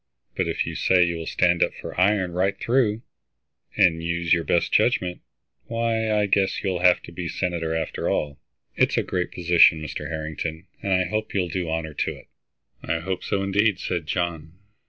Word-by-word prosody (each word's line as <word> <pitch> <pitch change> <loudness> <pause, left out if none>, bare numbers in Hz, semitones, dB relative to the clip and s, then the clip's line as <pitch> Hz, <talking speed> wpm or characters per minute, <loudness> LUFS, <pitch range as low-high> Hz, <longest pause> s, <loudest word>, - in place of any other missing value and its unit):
But - - 0
if - - -1
you - - -5
say 90 -1 +3
you 85 -1 -1
will 80 - -6
stand 90 -1 +2
up - - +2
for - - -8
iron 95 -2 +2
right 95 +3 0
through, 115 -3 +1 0.7
and 90 -5 +4
use 85 0 0
your 85 -1 +2
best 85 +2 0
judgment, 90 -1 +2 0.5
why, 115 -1 0
I 105 -1 +2
guess 100 -1 +1
you'll 95 -3 -1
have 90 0 +4
to - - -10
be 85 0 -5
senator 85 -3 -2
after 80 - -2
all. 70 -1 -2 0.4
It's - - +2
a - - +2
great 90 -1 -2
position, 85 -2 +5
Mr. 75 -3 -6
Harrington, 80 +1 -5 0.2
and 100 - -3
I 95 -1 +3
hope 110 +5 -3
you'll 90 -3 0
do 85 -1 -3
honor 80 -1 -3
to - - -2
it." - - -15 0.6
"I 80 - -1
hope 95 +1 -3
so, 100 - -1
indeed," 100 +1 +2
said 85 -4 -3
John. 85 -2 -3
90 Hz, 190 wpm, -24 LUFS, 80-95 Hz, 0.7 s, position